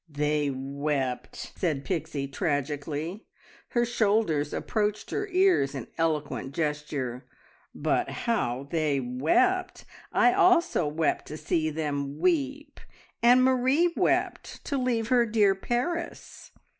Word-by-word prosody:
"They 150 0 0
wept!" 135 -1 -3 0.2
said 150 -6 -1
Pixie 160 -5 -2
tragically. 150 - -3 0.4
Her 240 0 +1
shoulders 210 -10 +1
approached 210 -1 -2
her 415 - -2
ears 365 - +3
in 130 - -6
eloquent 150 -4 -2
gesture. 150 -5 -3 0.5
"But - - 0
how 140 - -2
they 155 -4 +1
wept! 160 - +1 0.3
I 365 - +4
also 360 - +3
wept 155 +1 -1
to 155 - -6
see 155 +1 0
them 145 -2 -3
weep, 290 - -1 0.4
and 245 +2 +6
Marie 260 +7 +3
wept - - -1
to 280 - -1
leave 235 -3 0
her 240 -2 +4
dear 210 -3 +4
Paris." 250 - -4
165 Hz, 115 wpm, -27 LUFS, -, 0.5 s, and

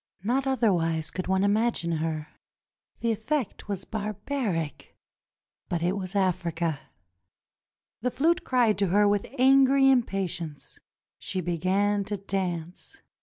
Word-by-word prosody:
Not 260 +5 0
otherwise 170 -11 +1
could 185 - -4
one 190 +1 +2
imagine 205 -4 +1
her; 155 -1 -3 0.7
the 235 - +1
effect 225 +3 -2
was 195 -2 -4
barbaric 210 - -3 0.4
— - - -58
but 170 -1 -1
it 180 +3 +1
was 190 0 -5
Africa. 170 -5 0 1.2
The 250 - +1
flute 320 +7 +1
cried 240 -5 +2
to 200 - +2
her 205 +3 +4
with 205 0 +1
angry 270 +1 +5
impatience. 185 - -2 0.4
She 185 - -3
began 190 +4 +1
to 205 +1 -3
dance. 180 -3 -4
195 Hz, 125 wpm, -27 LUFS, 175-230 Hz, 1.2 s, angry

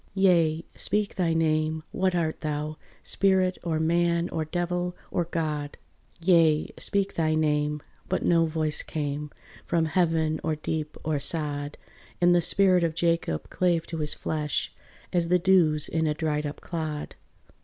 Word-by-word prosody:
"Yea, 170 -4 +3
speak 210 -1 -1
thy 175 -3 0
name, 155 -1 +1
what 185 -1 0
art 160 -2 -1
thou, 150 0 -3 0.3
spirit, 190 -2 +2
Or 165 -2 -1
man, 170 +1 +1
or 160 - -2
devil, 175 +2 -2
or 175 - 0
God? 155 -3 -3 0.4
Yea, 165 -3 +4
speak 200 -1 0
thy 155 -1 +1
name!" 150 -1 0 0.3
But 185 - 0
no 165 -1 +4
voice 155 -1 +1
came, 150 -1 -4 0.4
From 165 -1 +2
heaven 160 -1 +1
or 160 -1 0
deep 155 0 -4
or 155 -2 0
sod: 145 -1 -3 0.4
And 175 0 +5
the 175 - +4
spirit 185 0 +3
of 165 -2 0
Jacob 165 - 0
clave 175 -2 +1
to 165 - -5
his 150 -1 0
flesh 150 -2 -2 0.4
As 175 -2 +2
the 180 +1 +4
dews 170 -5 +3
in 160 -1 0
a 150 - 0
dried 150 -2 -1
up 145 - -8
clod. 155 -3 -4
160 Hz, 155 wpm, -27 LUFS, 155-175 Hz, 0.4 s, And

